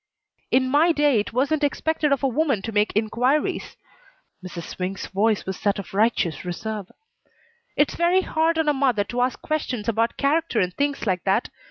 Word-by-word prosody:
"In 260 0 +3
my 300 +6 +4
day 290 -6 +3
it 205 - -3
wasn't 285 +5 0
expected 300 +1 0
of 280 0 +1
a - - +4
woman 270 -5 0
to 225 - -4
make 210 0 +2
inquiries." 245 +7 0 0.7
Mrs. 175 -2 -7
Swink's 185 +3 -5
voice 210 +2 0
was 190 -1 -5
that 200 +1 +1
of 200 - -8
righteous 200 -7 +1
reserve. 200 +2 -5 0.9
"It's 290 - +3
very 350 +2 +3
hard 325 -2 0
on 320 -1 +1
a 295 - +4
mother 260 -7 +2
to 240 +4 -3
ask 250 +1 0
questions 260 -8 -2
about 230 +1 0
character 295 -3 +1
and 180 -1 0
things 285 +1 -1
like 185 -4 0
that. 195 +4 +1
245 Hz, 180 wpm, -23 LUFS, 205-290 Hz, 0.9 s, my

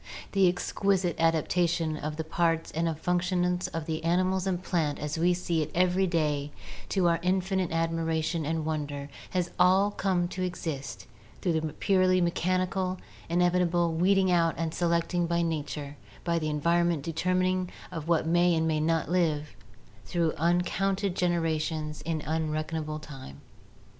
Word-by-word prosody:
The 195 -2 +4
exquisite 185 -1 0
adaptation 165 0 +1
of 150 0 -4
the 160 - -3
parts 165 0 0
and 165 -1 -1
functions 180 +1 0
of 165 -1 -5
the 160 0 -3
animal 185 +3 +2
and 180 -2 0
plant 160 -5 0
as 150 +2 -3
we 175 +2 +3
see 170 -2 -1
it 155 - -2
every 185 +2 +3
day 150 -4 0 0.4
to 185 -3 +2
our 170 -1 +3
in 180 +3 +1
finite 190 -1 -1
admiration 165 0 0
and 160 +1 -2
wonder 145 -2 -3 0.2
has 180 -2 -1
all 190 +3 +5
come 185 -3 0
to 185 - -5
exist 140 - -4 0.3
through 175 - 0
the 155 -1 -4
purely 185 -1 +3
mechanical, 185 +2 0 0.3
inevitable 175 -1 +2
weeding 190 +3 +3
out 170 -2 +3
and 165 -1 -2
selecting 170 0 +1
by 170 0 +1
nature 150 -3 -4 0.3
(by 170 -1 +1
the 155 -1 -2
environmental 170 +1 +1
determining 185 +2 +1 0.2
of 160 -3 -6
what 170 -2 +2
may 175 +1 +3
and 160 - +1
what - - +1
may 155 -1 +1
not 165 +1 +1
live) 155 -4 0 0.5
through 170 -3 0
uncounted 180 +3 +1
generations 160 -3 -1
in 155 -1 -3
unredeemable 155 0 -2
time. 135 - -10
170 Hz, 150 wpm, -28 LUFS, 160-180 Hz, 0.5 s, all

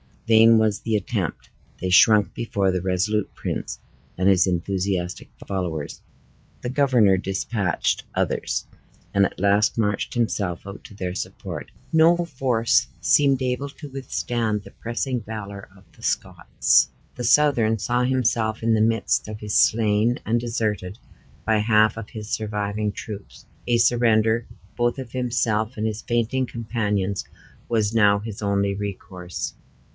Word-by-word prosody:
Vain 115 0 +7
was 110 -2 +2
the 115 -1 -1
attempt. 100 -4 -3 0.3
They 95 - -1
shrunk 105 +1 +5
before 100 -5 0
the 90 -1 -1
resolute 95 +3 0
prince - - -4 0.4
and 95 +2 +3
his 95 -1 +4
enthusiastic 90 0 -2 0.2
followers. 85 -6 -4 0.6
The 120 - -3
governor 125 -8 +4
dispatched 95 0 -1
others, - - -1 0.5
and 100 0 +4
at - - -5
last 100 +3 +2
marched 105 -3 -1
himself 100 -7 -1
out 100 +1 -9
to 105 - -12
their 90 -2 -4
support. 95 - -6 0.2
No 160 +2 +6
force 125 -4 +1
seemed 140 -3 +3
able 125 +2 -1
to 145 +1 -10
withstand 120 -5 -2
the - - -13
pressing 120 +2 -3
valor 100 -2 -7
of - - -19
the - - -21
Scots. - - +1 0.3
The 125 - -4
Southron 120 -5 +4
saw 120 +4 0
himself 115 -4 0
in 115 0 +3
the 110 - +2
midst 115 -1 +1
of 105 0 -7
his 105 -1 -3
slain, 110 +2 +3
and 115 +2 +1
deserted 110 -5 -2 0.5
by 110 0 +3
half 110 0 +3
of 115 -2 -7
his 110 -1 -8
surviving 105 -1 -2
troops. 105 -2 -9 0.2
A 120 -1 +3
surrender, 115 -1 +3 0.3
both 120 +1 +1
of 130 -3 -7
himself 120 -3 -1
and 110 - -1
his 110 -1 -2
fainting 120 +2 0
companions, 105 -5 -2 0.4
was 110 -2 0
now 105 -3 +5
his 105 0 -7
only 100 -1 +1
recourse. 95 -3 -5
110 Hz, 140 wpm, -23 LUFS, 100-120 Hz, 0.6 s, Vain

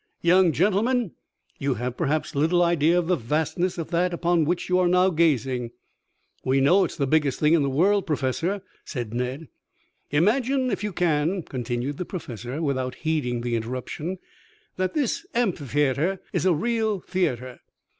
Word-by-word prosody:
"Young 180 0 +5
gentlemen, 210 - +1 0.5
you 140 -2 0
have, 125 +2 -3
perhaps, 155 +1 -1
little 165 +5 +3
idea 170 0 +3
of 175 - +1
the 180 +2 +2
vastness 160 - -1
of 165 - -5
that 175 +1 +1
upon 170 -2 +2
which 175 +3 -1
you 180 0 +2
are 180 - +3
now 180 +1 +4
gazing." 135 -7 +1 0.7
"We 130 +1 +2
know 180 +8 +5
it - - -5
is - - -13
the 140 - +1
biggest 145 -1 +1
thing 150 +1 +4
in 165 - +4
the 140 - +1
world, 190 +9 +2
Professor," 165 +7 -1 0.2
said 120 -4 -5
Ned. 125 +6 -3 0.6
"Imagine, 250 - +2
if 200 - -2
you 210 - -2
can," 170 +1 0
continued 125 +2 -3
the 180 - -2
Professor, 130 - -6
without 130 -3 -1
heeding 145 -7 -1
the 120 0 -1
interruption, 130 +10 -4 0.6
"that 185 0 -2
this 285 -7 0
amphitheatre 150 - 0
is - - +1
a 180 - +5
real 220 +1 0
theatre. 130 -11 -2
160 Hz, 165 wpm, -25 LUFS, 135-185 Hz, 0.7 s, Young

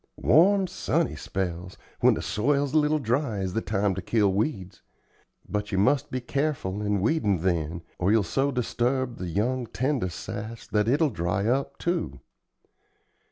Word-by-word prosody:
Warm, 190 - +4
sunny 170 -2 -1
spells, 90 -1 -4 0.2
when - - +5
the - - -4
soil's 140 +7 0
a - - +4
little 150 +1 +2
dry, 125 -3 -1
is 95 -1 -2
the 115 - 0
time 100 -1 0
to 95 - -4
kill 100 0 +2
weeds. 95 - -2 0.7
But 105 0 -3
you 95 - 0
must 115 +8 +2
be 130 - -2
careful 125 -7 -2
in 105 -2 0
weedin' 105 - +1
then, 85 -2 -1 0.2
or 90 +3 +2
you'll 110 -1 +4
so 135 +10 0
disturb 125 0 -1
the 90 - -5
young, 120 +7 -1
tender 130 -6 -1
sass 110 +6 -7
that 105 0 0
it'll 145 +4 +3
dry 90 +2 -1
up, 130 +4 0
too. 125 - -2
110 Hz, 160 wpm, -26 LUFS, 95-140 Hz, 0.7 s, when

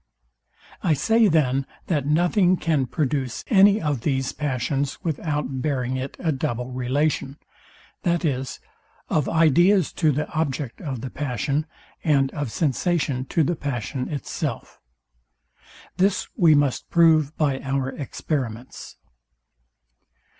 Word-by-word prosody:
I 165 -7 +2
say 220 +10 +3
then, 135 -5 +2 0.2
that 145 -5 -1
nothing 175 +4 +3
can 150 -7 0
produce 135 -3 -2
any 205 -1 +6
of 145 - -1
these 135 -1 0
passions 140 0 -2
without 150 -4 -2
bearing 130 -3 -1
it 130 +1 -5
a 165 - 0
double 125 -2 -3
relation, 135 +2 -1 0.7
viz, 150 -7 -1 0.5
of 150 -3 +1
ideas 170 +3 +4
to 155 -3 +2
the 150 +2 -1
object 145 -5 -2
of 135 -9 -4
the 130 - -6
passion, 145 +2 -2 0.4
and 135 -4 +2
of 145 -6 -4
sensation 145 -3 0
to 160 +4 +1
the 175 +4 0
passion 130 -2 -4
itself. 145 -3 -5 1.2
This 190 +1 +1
we 165 -7 +5
must 145 -3 0
prove 160 -3 +4
by 140 -4 +1
our 135 -1 -1
experiments. 130 -4 -5
145 Hz, 120 wpm, -24 LUFS, 130-160 Hz, 1.2 s, any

